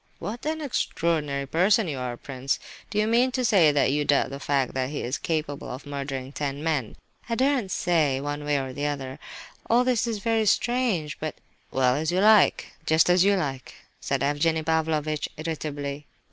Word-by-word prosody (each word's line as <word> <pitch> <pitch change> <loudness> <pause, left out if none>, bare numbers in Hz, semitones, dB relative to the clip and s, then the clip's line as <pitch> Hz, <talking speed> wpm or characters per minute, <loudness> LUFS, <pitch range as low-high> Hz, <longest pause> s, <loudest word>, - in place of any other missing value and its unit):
"What 235 +7 -5
an 315 0 -2
extraordinary 160 - -1
person 190 +8 +3
you 140 -4 -3
are, 125 -1 -4
prince! 135 0 -3 0.3
Do - - -4
you 210 - +3
mean 240 +3 +3
to 255 -1 0
say 185 -9 +5
that 145 -2 +2
you 145 +1 +1
doubt 140 -2 +2
the 140 - -6
fact 140 -2 0
that 130 0 -1
he 145 - -4
is 125 +3 -2
capable 155 -3 -3
of 130 +3 -7
murdering 135 -2 -5
ten 140 0 -4
men?" 150 -8 -1 0.3
"I 230 - 0
daren't 260 -4 +1
say, 160 -7 +1
one 145 +1 -4
way 145 -1 +1
or 130 -1 -5
the 145 +2 -2
other; 135 -3 -4 0.5
all 240 +2 +5
this 250 -2 +1
is 225 -2 -1
very 220 +1 +1
strange—but—" 185 - 0 0.3
"Well, 130 -1 +2
as 155 +3 -1
you 180 - +1
like, 215 0 +4
just 160 +2 +4
as 180 0 +5
you 200 +1 +4
like," 135 -8 -4 0.2
said 135 -1 -1
Evgenie 155 +3 +1
Pavlovitch, 155 -1 0
irritably. 145 -2 -4
155 Hz, 185 wpm, -26 LUFS, 140-200 Hz, 0.5 s, say